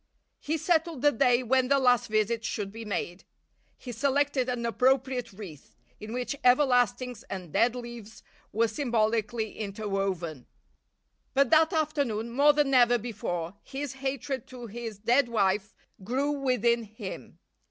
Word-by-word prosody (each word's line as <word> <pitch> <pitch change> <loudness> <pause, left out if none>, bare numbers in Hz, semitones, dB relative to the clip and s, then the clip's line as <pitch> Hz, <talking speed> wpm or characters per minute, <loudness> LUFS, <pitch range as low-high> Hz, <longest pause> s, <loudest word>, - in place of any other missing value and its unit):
He 315 +2 -2
settled 325 -3 0
the 290 - +6
day 245 0 +3
when 255 +1 +2
the 280 +1 +4
last 250 -4 +3
visit 215 +1 0
should 205 -4 -3
be 225 +2 -8
made. 195 -3 -4 0.5
He 250 - -8
selected 275 +1 +1
an 240 -1 -2
appropriate 255 0 +1
wreath, 190 -8 -11 0.2
in 215 +1 -8
which 250 +3 -3
everlastings 250 -2 +3
and 180 -5 -7
dead 240 +1 +3
leaves 235 -3 -9 0.3
were 230 +2 +2
symbolically 225 -2 -1
interwoven. 195 - -3 0.9
But 275 -2 +3
that 320 +1 +5
afternoon 285 - -1
more 285 +4 +5
than 290 -2 +1
ever 245 -1 +5
before 190 -7 -4
his 275 0 -5
hatred 270 -1 -4
to 250 -2 -9
his 225 -1 -7
dead 240 +5 +2
wife 205 -2 0 0.3
grew 265 +8 0
within 250 -4 +1
him. 220 0 -9
240 Hz, 140 wpm, -28 LUFS, 215-270 Hz, 0.9 s, the